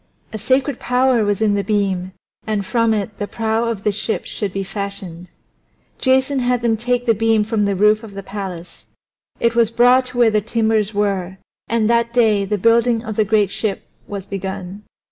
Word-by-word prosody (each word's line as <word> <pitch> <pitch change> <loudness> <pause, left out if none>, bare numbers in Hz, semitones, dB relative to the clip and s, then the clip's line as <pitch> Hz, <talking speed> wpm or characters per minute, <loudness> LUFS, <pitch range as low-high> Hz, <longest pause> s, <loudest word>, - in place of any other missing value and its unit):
A 220 - -4
sacred 260 +4 0
power 250 -2 +2
was 205 +1 0
in 210 -2 +3
the 200 0 0
beam, 195 -3 -1 0.3
and 210 -2 -1
from 230 +2 +1
it 210 -1 -2
the 205 - -2
prow 225 +1 -1
of 225 -4 -3
the 210 - +2
ship 215 +2 -3
should 205 -3 -4
be 195 +1 -3
fashioned. 195 -3 -6 0.7
Jason 265 +1 +2
had 245 -1 0
them 230 -1 +2
take 245 +2 -1
the 230 - +4
beam 225 0 +2
from 215 -1 0
the 200 -1 0
roof 210 +2 +3
of 210 -3 -11
the 195 - -6
palace; 190 -3 -8 0.5
it 235 0 +2
was 230 -2 +3
brought 245 +2 +4
to 250 -1 -8
where 235 -2 +5
the 210 0 +2
timbers 220 -1 0
were, 195 -3 -1 0.3
and 225 -2 +1
that 235 0 +1
day 215 -4 +3
the 210 +1 -1
building 230 +2 +3
of 220 -2 -5
the 215 - +3
great 210 -2 +2
ship 205 -2 -2 0.2
was 200 -2 -6
begun. 190 0 -6
215 Hz, 195 wpm, -19 LUFS, 200-235 Hz, 0.7 s, where